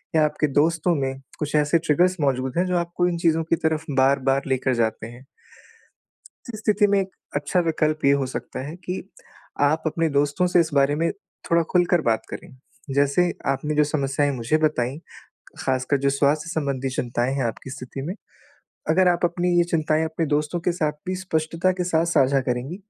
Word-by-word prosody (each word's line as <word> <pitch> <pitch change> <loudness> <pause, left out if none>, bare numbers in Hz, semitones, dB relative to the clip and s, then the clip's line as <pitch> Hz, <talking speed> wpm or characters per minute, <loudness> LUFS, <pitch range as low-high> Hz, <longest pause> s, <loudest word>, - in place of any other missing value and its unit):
या 155 - +5
आपके 150 0 0
दोस्तों 160 +5 +2
में 135 -1 -2 0.2
कुछ 150 -1 -2
ऐसे 150 +2 +3
ट्रिगर्स 175 +4 +2
मौजूद 130 0 0
हैं, 180 - +3
जो 180 -1 0
आपको 175 +1 0
इन 175 - -1
चीज़ों 165 -1 +2
की 165 +1 +1
तरफ 160 -1 -1
बार-बार 135 0 +3
लेकर 130 0 0
जाते 115 -1 -1
हैं। 120 +3 -13 1.3
इस 215 - -6
स्थिति 210 -1 +3
में 200 0 +3
एक 190 0 -2 0.3
अच्छा 145 +5 0
विकल्प 155 -1 0
ये 140 - +6
हो - - 0
सकता 125 -1 -6
है 155 - -7
कि, 180 +1 -5 0.6
आप 150 +3 +2
अपने 165 +1 0
दोस्तों 145 +5 +1
से 175 - +3
इस 165 -1 +2
बारे 140 +1 +3
में 165 +2 0 0.4
थोड़ा 170 0 +4
खुलकर 175 -1 +3
बात 115 -5 0
करें। 165 -6 -9 0.4
जैसे, 145 +5 +2
आपने 135 +3 -1
जो 150 - +5
समस्याएँ 145 -1 0
मुझे 120 +6 +1
बताईं, 150 -3 0 0.7
खासकर 130 +1 +1
जो 140 - +4
स्वास्थ्य 150 +3 +1
संबंधी 140 -4 -2
चिंताएँ 125 +1 -1
हैं 135 -3 -1
आपकी 115 +3 -5
स्थिति 130 +1 -7
में। 170 +7 -4 0.8
अगर 180 +3 +4
आप 175 0 +1
अपनी 175 +1 +1
ये 175 - +5
चिंताएँ 160 -2 +1
अपने 160 0 -2
दोस्तों 150 +3 -1
के 175 - 0
साथ 155 -3 -1
भी 185 - -1
स्पष्टता 170 0 0
के 180 - +1
साथ 165 -2 +1
साझा 140 -4 +3
करेंगी, 125 +7 -2
155 Hz, 185 wpm, -23 LUFS, 135-170 Hz, 1.3 s, ये